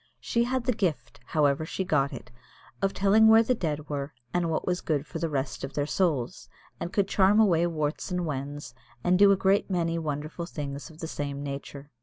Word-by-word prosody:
She 235 0 0
had 255 0 -1
the 250 0 +1
gift, 150 - -2
however 150 -1 +2
she 175 +4 -3
got 145 -6 +1
it, - - -9 0.5
of 195 0 +2
telling 205 +3 +4
where 220 +1 +7
the 255 - +2
dead 155 -8 -3
were, 140 -1 -4 0.2
and 175 -1 +1
what 160 - -1
was 180 0 -1
good 150 -2 -1
for 165 - -6
the 165 0 -1
rest 135 -2 -3
of 135 - -5
their 145 0 0
souls; 150 -7 -1 0.3
and 175 - -4
could 200 -1 +1
charm 195 +2 +4
away 175 -6 +4
warts 155 -1 -2
and 180 -1 -1
wens, 145 -2 -5 0.3
and 180 +1 +3
do 200 0 +7
a 195 - +4
great 195 +2 +2
many 170 -2 0
wonderful 155 +2 -4
things 140 -3 -6
of 160 0 -14
the 160 - -3
same 140 -2 -4
nature. 140 0 -7
160 Hz, 210 wpm, -27 LUFS, 145-190 Hz, 0.5 s, where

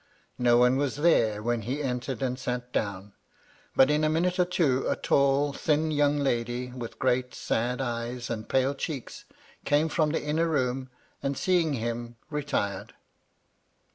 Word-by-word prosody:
No 120 -1 +5
one 125 +2 +4
was 140 -2 0
there 115 -9 +2
when 120 0 0
he 130 +7 -3
entered 125 0 -3
and 130 0 -1
sat 125 -1 -4
down. 100 -1 -3 0.6
But, 135 +2 +6
in 150 +1 +2
a 155 - +3
minute 180 +4 +1
or 180 - +5
two, 150 -7 +1
a - - +2
tall, 140 +1 +2
thin 155 +2 +1
young 145 -1 +2
lady, 125 -2 -1
with 120 -2 -7
great, 125 -1 0
sad 120 +3 -1
eyes, 120 0 -3
and 110 -1 -5
pale 130 +1 +2
cheeks, 140 -2 -6 0.4
came 150 +2 +2
from 155 0 +1
the 160 - -1
inner 155 +3 +1
room, 130 -4 -1 0.3
and, 140 -1 -2
seeing 175 -5 +2
him, 120 -1 -3 0.2
retired. 140 -10 -2
130 Hz, 160 wpm, -27 LUFS, 120-150 Hz, 0.6 s, But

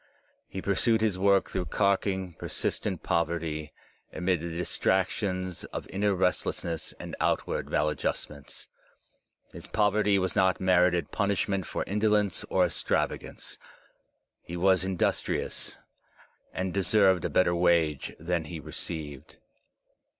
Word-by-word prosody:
He 95 - -6
pursued 110 +3 +2
his 105 -4 +1
work 100 0 +3
through 90 -1 -1
carking, 95 -2 0
persistent - - -3
poverty, 80 -2 -1 0.4
amid 90 -2 0
the 85 - -4
distractions 95 +1 -1
of - - -6
inner 100 +1 +1
restlessness 85 -2 -1
and - - -6
outward - - 0
maladjustments. 75 -1 -2 0.9
His - - -9
pov 105 -2 +2
erty 105 -1 +3
was 95 -2 -1
not 95 -1 +3
merited 90 -1 +3
punishment 100 -2 0
for - - -2
indolence 105 -1 +1
or - - +4
extrava - - 0
gance. - - -10 0.8
He 85 - -7
was 95 +1 +4
industrious, 95 -2 -1 0.7
and 95 -1 -3
deserved 95 -2 +3
a - - 0
better 90 -1 +3
wage 85 -4 +2
than 85 0 -1
he 80 +1 -6
received. 75 -1 -7
95 Hz, 120 wpm, -28 LUFS, 85-100 Hz, 0.9 s, or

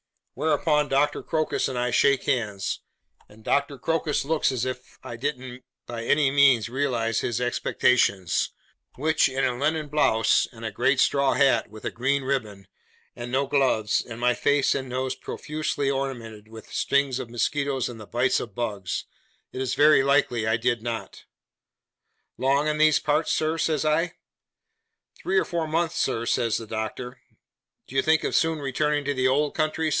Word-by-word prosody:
Whereupon 150 -1 +1
Doctor 145 +2 +1
Crocus 155 -1 -1
and 130 - -4
I 125 0 0
shake 140 +2 +3
hands; 105 -8 -1 0.5
and 110 +1 -18
Doctor 140 +2 0
Crocus 155 0 -1
looks 155 -2 +1
as 130 -2 -2
if 130 0 -7
I 120 - -7
didn't 130 0 -5 0.2
by 115 -1 -6
any 145 +1 +3
means 135 -5 +4
realise 120 -4 0
his 120 -1 -2
expectations, 120 -6 +1 0.5
which, 155 +2 +2
in 135 +1 0
a 125 - 0
linen 150 +3 -1
blouse, 125 -7 +3
and 115 -2 -10
a 110 - -3
great 130 +5 +1
straw 140 0 +3
hat, 135 -7 +2
with 110 +1 -12
a - - -2
green 135 +3 0
ribbon, 110 -8 -3 0.5
and 120 0 -7
no 135 +2 +1
gloves, 130 -6 +1
and 115 -1 -9
my 125 0 +3
face 145 +2 +2
and 130 -2 -4
nose 130 +1 -2
profusely 150 0 -3
ornamented 120 -6 -5
with 110 -1 -12
the - - -14
stings 140 -2 +1
of 120 - -6
mosquitoes 135 +2 -1
and 120 -2 -8
the 105 - -10
bites 120 +2 +1
of 110 -5 -7
bugs, 105 -6 -3 0.5
it 130 - -5
is 130 -2 -1
very 150 -1 +6
likely 135 -5 +1
I 110 0 +2
did 120 0 0
not. 115 -1 -6 1.1
'Long 140 +3 +2
in 150 0 -1
these 155 0 +5
parts, 150 +2 0
sir?' 160 +1 0
says 155 -2 0
I. 165 +3 +1 1.1
'Three 190 - 0
or - - +3
four 170 -2 -2
months, 165 +1 -1
sir,' 115 +1 0
says 115 -1 +1
the 115 - -7
Doctor. 110 +3 -5 0.6
'Do 135 - -13
you 135 - +4
think 160 +2 +2
of - - -2
soon 160 0 +2
returning 145 +1 -1
to 145 - 0
the 130 -1 +1
old 145 +3 +1
country? 155 0 0
130 Hz, 175 wpm, -25 LUFS, 120-145 Hz, 1.1 s, very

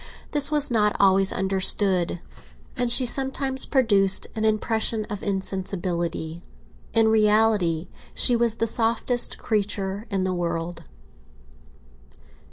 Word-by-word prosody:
This 290 -1 +4
was 295 -2 +3
not 210 -3 +1
always 195 -1 +4
understood, 190 -2 +1 0.6
and 245 -1 -1
she 255 +1 +3
sometimes 265 +1 +1
produced 200 -8 +2
an 220 - -3
impression 220 0 0
of 205 - -5
insensibility. 180 -4 -4 0.5
In 225 -1 +2
reality 210 -6 +2 0.3
she 245 - +4
was 235 -1 +1
the 230 - -1
softest 230 +2 -1
creature 205 -1 -3
in 195 -3 -2
the 185 0 -2
world. 170 -1 -4
210 Hz, 110 wpm, -23 LUFS, 190-230 Hz, 0.6 s, This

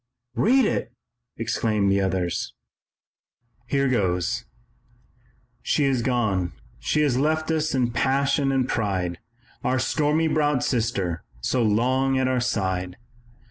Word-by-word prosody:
'" - - -58
"Read 260 +2 +4
it!" 120 - -1 0.5
exclaimed 110 -3 0
the 100 0 +2
others. 95 -3 -2 1.1
"Here 140 +2 +1
goes: 90 -8 0 1.2
"She 150 - +1
has 135 -3 +2
gone 110 -8 0 0.3
she 150 - 0
has 135 -4 +2
left 155 +2 +1
us 155 -2 0
in 125 -2 +1
passion 135 +3 +1
and 130 -2 +1
pride, 95 -7 -1 0.4
Our 130 - +1
stormy 150 +4 +1
browed 150 -4 +1
sister 100 - -1 0.2
so 125 - 0
long 130 +5 +2
at 130 0 +1
our 130 -1 +1
side! 95 -6 -1
125 Hz, 125 wpm, -24 LUFS, 100-140 Hz, 1.2 s, Read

